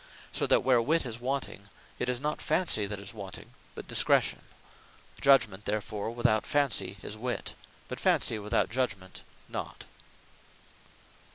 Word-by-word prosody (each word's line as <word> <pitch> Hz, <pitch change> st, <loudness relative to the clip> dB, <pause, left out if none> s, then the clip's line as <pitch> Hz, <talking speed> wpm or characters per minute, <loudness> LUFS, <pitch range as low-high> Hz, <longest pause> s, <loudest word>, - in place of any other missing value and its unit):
So -, -, 0 dB
that -, -, +4 dB
where 125 Hz, -2 st, +4 dB
Wit 160 Hz, +5 st, +1 dB
is 115 Hz, -2 st, -5 dB
wanting, 125 Hz, -6 st, -3 dB, 0.3 s
it 125 Hz, -, -1 dB
is 125 Hz, -1 st, 0 dB
not 150 Hz, +2 st, -2 dB
Fancy 110 Hz, -, +2 dB
that 105 Hz, 0 st, -4 dB
is 100 Hz, +2 st, -8 dB
wanting, 100 Hz, -4 st, -9 dB, 0.2 s
but -, -, -8 dB
Discretion. -, -, +2 dB, 0.8 s
Judgement 115 Hz, -8 st, +4 dB
therefore 105 Hz, 0 st, -2 dB
without 115 Hz, -2 st, +2 dB
Fancy 135 Hz, -9 st, +1 dB
is 105 Hz, -, -4 dB
Wit, 120 Hz, +3 st, -3 dB, 0.3 s
but -, -, -6 dB
Fancy 110 Hz, -, +3 dB
without 105 Hz, +2 st, 0 dB
Judgement 100 Hz, -7 st, -2 dB, 0.3 s
not. -, -, -6 dB
115 Hz, 135 wpm, -30 LUFS, 105-130 Hz, 0.8 s, that